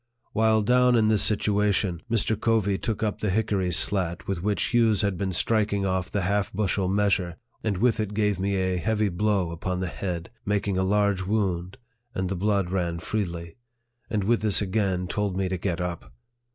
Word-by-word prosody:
While 110 0 +3
down 125 +2 +4
in 110 -2 +3
this 105 -2 +3
situation, 105 -4 +1
Mr. 110 -1 +1
Covey 105 -3 +1
took 110 -1 -2
up 105 -2 -2
the 105 - 0
hickory 100 -2 0
slat 85 -1 0
with 95 -4 -2
which 105 +2 0
Hughes 110 -3 +3
had 100 -2 +1
been 95 +2 -2
striking 100 +1 +1
off 95 -1 -1
the 100 -1 -1
half 100 +2 0
bushel 100 -1 0
measure, 95 -3 +1 0.3
and 105 -4 0
with 115 +2 +2
it 105 -1 -2
gave 105 -3 +1
me 100 +1 0
a 95 -1 0
heavy 110 +2 0
blow 95 -1 0
upon 90 +2 -3
the 95 - -1
head, 90 -2 -5
making 100 -1 0
a 95 - +1
large 100 -1 +2
wound, 95 -2 -1 0.4
and 95 -1 -1
the 95 - -2
blood 100 -1 0
ran 85 -3 -1
freely; 85 -4 -4 0.5
and 105 -4 0
with 115 +4 +2
this 105 -3 +3
again 95 -2 0
told 100 0 -2
me 95 -1 0
to 95 0 -2
get 85 -2 -2
up. 85 -8 -4
100 Hz, 190 wpm, -26 LUFS, 90-105 Hz, 0.5 s, down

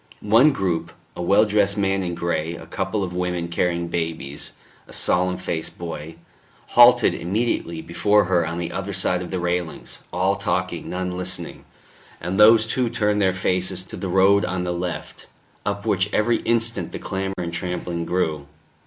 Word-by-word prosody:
One 130 +7 +7
group 85 - -2 0.2
a - - -5
well 100 +5 +4
dressed 105 -1 +2
man 95 -1 +1
in 90 -2 -3
grey, 85 -1 -2
a 80 - -10
couple 95 +4 -2
of 90 -2 -4
women 90 -1 -2
carrying 85 0 0
babies, 80 -4 -4 0.3
a - - -13
solemn 90 0 +1
faced 85 -3 -4
boy 80 -2 -6 0.5
halted - - +6
immediately 90 -4 -2
before 105 +5 +3
her 90 -1 +2
on 80 +1 -3
the 85 -1 -3
other 95 +1 -4
side 90 -1 +1
of 90 - -6
the 95 - -2
railings, 90 -1 -3
all 95 +2 +1
talking, 90 -4 -2
none 90 0 -3
listening, 90 +1 -4 0.5
and 90 +4 -3
these 110 +1 +7
too 120 +1 0
turned 105 -3 +1
their 95 -1 +4
faces 90 0 0
to - - -10
the 95 - -4
road 95 +2 +4
on 90 0 -2
the 90 0 -2
left, 85 0 -5 0.4
up 100 0 -2
which 100 -1 +1
every 115 +2 +2
instant 115 0 0
the - - -3
clamour 95 0 -3
and 85 -1 -4
trampling 85 -1 -3
grew. 80 -5 -1
90 Hz, 170 wpm, -23 LUFS, 85-100 Hz, 0.5 s, One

